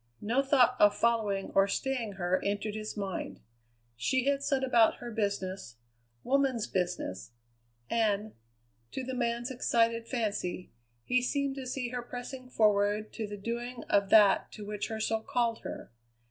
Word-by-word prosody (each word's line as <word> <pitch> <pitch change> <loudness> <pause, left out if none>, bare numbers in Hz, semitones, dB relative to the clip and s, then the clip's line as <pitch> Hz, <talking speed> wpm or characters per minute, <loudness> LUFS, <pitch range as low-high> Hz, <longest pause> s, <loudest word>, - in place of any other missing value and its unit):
No 235 +6 +1
thought 265 -3 +4
of 205 0 +5
following 215 -4 +1
or 195 0 +5
staying 235 0 -2
her 185 -1 0
entered 205 +1 -1
his 215 0 -5
mind; 190 - -4 0.6
she 255 - 0
had 280 0 +2
set 280 -1 0
about 235 -4 +4
her 240 - -8
business, 195 - -3 0.5
woman's 265 -3 +1
business, 175 - -3 0.5
and, 215 -2 0 0.6
to 265 - -3
the 260 +1 -4
man's 240 0 -1
excited 230 -2 +1
fancy, 205 -7 -2 0.3
he 250 - +2
seemed 280 +2 0
to 260 -1 -5
see 250 -1 -3
her 245 0 -3
pressing 250 +1 -8
forward 210 -2 +2
to 220 -2 -4
the 205 0 -6
doing 235 +3 -4
of 200 -1 +3
that 210 -2 +5
to 210 - -8
which 210 0 -3
her 220 -1 -4
soul 220 0 0
called 235 0 0
her. - - -8
225 Hz, 155 wpm, -30 LUFS, 205-250 Hz, 0.6 s, of